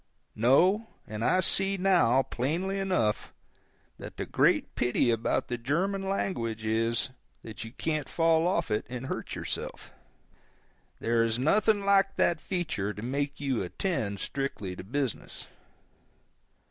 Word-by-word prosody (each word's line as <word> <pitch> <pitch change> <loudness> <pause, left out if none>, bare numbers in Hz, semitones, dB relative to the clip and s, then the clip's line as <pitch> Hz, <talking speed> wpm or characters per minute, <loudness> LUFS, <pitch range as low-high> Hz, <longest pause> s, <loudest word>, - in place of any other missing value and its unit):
No—and 135 - +2
I 185 +9 +3
see 195 +2 +4
now, 175 -10 +4
plainly 175 +12 -2
enough, 185 - 0 0.7
that - - -9
the - - -3
great - - +2
pity 120 0 +2
about 115 0 0
the 120 -1 -3
German 190 +10 -1
language 115 - -2
is, 115 +3 +1 0.3
that 110 -2 -7
you 115 - -8
can't 155 -3 -2
fall 165 0 +3
off 175 -2 0
it 105 - +1
and 125 +1 -5
hurt - - -4
yourself. - - -5 1.1
There 115 0 +2
is 115 0 +1
nothing 205 - +2
like 195 -1 +4
that 170 -3 +2
feature 160 - -2
to 105 - -7
make 140 +3 -2
you 135 -4 0
attend 100 - -2
strictly 115 -9 -4
to - - -8
business. 130 +3 -3
135 Hz, 135 wpm, -29 LUFS, 115-185 Hz, 1.1 s, see